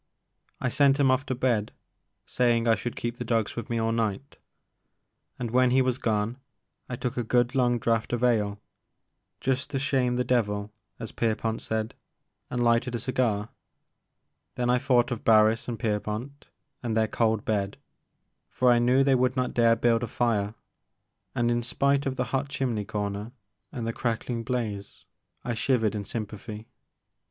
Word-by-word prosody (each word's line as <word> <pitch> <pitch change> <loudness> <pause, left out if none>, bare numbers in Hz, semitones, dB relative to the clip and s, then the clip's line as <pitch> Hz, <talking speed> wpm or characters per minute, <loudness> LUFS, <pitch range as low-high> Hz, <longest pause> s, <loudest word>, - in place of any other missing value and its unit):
I 125 - 0
sent 140 +3 +3
him 135 -2 +4
off 130 +2 0
to 130 - -1
bed, 120 -4 0 0.5
saying 120 -2 +1
I 115 - +6
should 120 +1 -3
keep 120 0 -4
the 125 - -4
dogs 115 -3 0
with 120 - -5
me 120 - -1
all 115 0 +1
night; 115 +3 -2 1.0
and 120 -3 -4
when 130 +1 +4
he 130 +1 +4
was 130 -1 0
gone, 110 +2 0 0.5
I 125 - -3
took 125 +1 -4
a 120 - 0
good 120 +2 +2
long 125 -2 +2
draught 115 -1 0
of 120 0 -1
ale, 105 -4 +2 0.4
*' - - -53
just 130 0 0
to 135 - -2
shame 130 -2 +1
the 125 - +1
devil," 105 -4 0 0.3
as 115 -2 -7
Pierpont 115 0 -1
said, 110 0 -2 0.6
and 125 -1 -1
lighted 120 +1 +2
a - - -2
cigar. 115 -4 0 1.1
Then 125 0 +1
I 125 - +3
thought 125 -3 +2
of 120 - -3
Barris 110 0 +4
and 120 -2 -3
Pierpont, 110 +5 -3 0.3
and 115 -2 -1
their 110 0 +3
cold 110 -1 0
bed, 100 -2 -1 0.7
for 125 -1 +3
I 120 - +5
knew 125 +3 +4
they 135 0 +3
would 130 0 +2
not 125 -1 -1
dare 115 -1 +4
build 115 0 +2
a 120 - -2
fire, 110 -3 0 0.8
and, 120 0 +2
in 120 0 +1
spite 140 +3 +1
of 130 - -2
the - - 0
hot 135 +1 0
chimney 125 -7 -2
comer 105 +2 -4 0.4
and 120 -3 -4
the 115 - -2
crackling 115 0 -2
blaze, 110 -5 -4 0.4
I 120 - -2
shivered 110 -2 +1
in 105 -2 -4
sympathy. 105 0 -6
120 Hz, 175 wpm, -27 LUFS, 110-125 Hz, 1.1 s, I